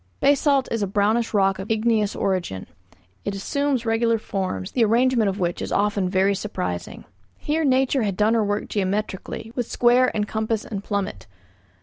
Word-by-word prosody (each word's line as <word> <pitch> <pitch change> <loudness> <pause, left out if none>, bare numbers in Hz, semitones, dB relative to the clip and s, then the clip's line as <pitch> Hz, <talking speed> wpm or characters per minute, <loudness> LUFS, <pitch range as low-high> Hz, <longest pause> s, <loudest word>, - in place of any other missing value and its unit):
Basalt 280 -1 +3
is 230 - -1
a 200 - 0
brownish 210 +4 +1
rock 195 -2 +2
of 190 - -6
igneous 220 -2 +1
origin. 180 - -2 0.6
It 200 - -3
assumes 270 +4 -1
regular 230 0 +2
forms, 185 - -4
the 240 - +2
arrangement 230 0 +3
of 195 - -3
which 175 -1 -1
is - - -4
often 200 -2 +1
very 190 +1 +2
surprising. 185 - -4 0.3
Here 315 +2 -1
nature 265 -1 +2
had 200 -4 -1
done 215 +2 +3
her 225 -2 +2
work 205 0 -1
geometrically, 205 +2 -3
with 245 -2 -2
square 245 +1 +4
and 210 -1 0
compass 220 +1 -2
and 200 -3 -5
plummet. 200 - -3
210 Hz, 165 wpm, -23 LUFS, 195-235 Hz, 0.6 s, square